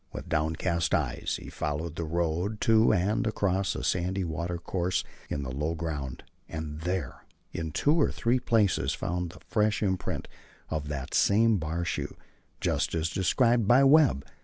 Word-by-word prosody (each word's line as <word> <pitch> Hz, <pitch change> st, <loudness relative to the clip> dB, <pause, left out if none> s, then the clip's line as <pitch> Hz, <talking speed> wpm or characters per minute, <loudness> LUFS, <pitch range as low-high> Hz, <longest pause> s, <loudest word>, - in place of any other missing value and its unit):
With -, -, -7 dB
downcast 80 Hz, +2 st, 0 dB
eyes -, -, -1 dB
he -, -, -10 dB
followed 75 Hz, +2 st, -3 dB
the 85 Hz, -, -3 dB
road 85 Hz, +6 st, -1 dB
to 110 Hz, 0 st, +5 dB
and 100 Hz, +6 st, +1 dB
across 100 Hz, -3 st, 0 dB
a -, -, -4 dB
sandy 95 Hz, +2 st, 0 dB
watercourse 85 Hz, +2 st, -2 dB, 0.3 s
in 70 Hz, -, -2 dB
the 65 Hz, -, -5 dB
low 75 Hz, +5 st, -2 dB
ground, 75 Hz, -5 st, -4 dB, 0.3 s
and 80 Hz, -2 st, -5 dB
there, 90 Hz, +2 st, -3 dB, 0.3 s
in 80 Hz, -2 st, -4 dB
two 150 Hz, -, +2 dB
or -, -, +3 dB
three 120 Hz, +2 st, +1 dB
places 105 Hz, -, +2 dB
found 90 Hz, 0 st, -2 dB
the 90 Hz, -, -14 dB
fresh 105 Hz, -1 st, +1 dB
imprint 95 Hz, -2 st, -2 dB, 0.4 s
of 75 Hz, -2 st, -2 dB
that 70 Hz, -3 st, -5 dB
same 110 Hz, 0 st, +4 dB
bar 80 Hz, +2 st, -2 dB
shoe, -, -, -3 dB, 0.4 s
just -, -, 0 dB
as 80 Hz, +1 st, -1 dB
described 115 Hz, +4 st, +2 dB
by 125 Hz, +4 st, +6 dB
Webb. 135 Hz, -, +5 dB
85 Hz, 160 wpm, -28 LUFS, 80-105 Hz, 0.4 s, by